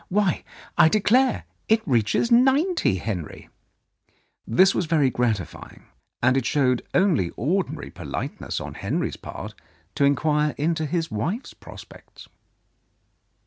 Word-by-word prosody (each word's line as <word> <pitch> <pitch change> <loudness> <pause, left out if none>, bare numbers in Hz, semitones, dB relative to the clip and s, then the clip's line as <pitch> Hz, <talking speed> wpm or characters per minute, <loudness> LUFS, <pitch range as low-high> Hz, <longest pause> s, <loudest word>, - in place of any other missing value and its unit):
Why, 195 -3 +1 0.4
I 160 - +7
declare 240 +6 +2 0.3
it 220 0 +2
reaches 125 - +1
ninety, 270 - +3
Henry! 90 -4 -5 0.5
" - - -43
This 190 +1 +6
was 175 - -1
very 150 -5 +2
gratifying, 115 -7 -3 0.4
and 125 +2 +4
it 135 -3 0
showed 125 -4 +2
only 175 - +3
ordinary 175 - -2
politeness - - -5
on - - -7
Henry's - - -2
part - - -8 0.4
to 105 - 0
inquire 150 +1 +2
into 155 +1 0
his 165 -1 -2
wife's 170 - -3
prospects. - - -14
155 Hz, 120 wpm, -24 LUFS, 125-200 Hz, 0.5 s, I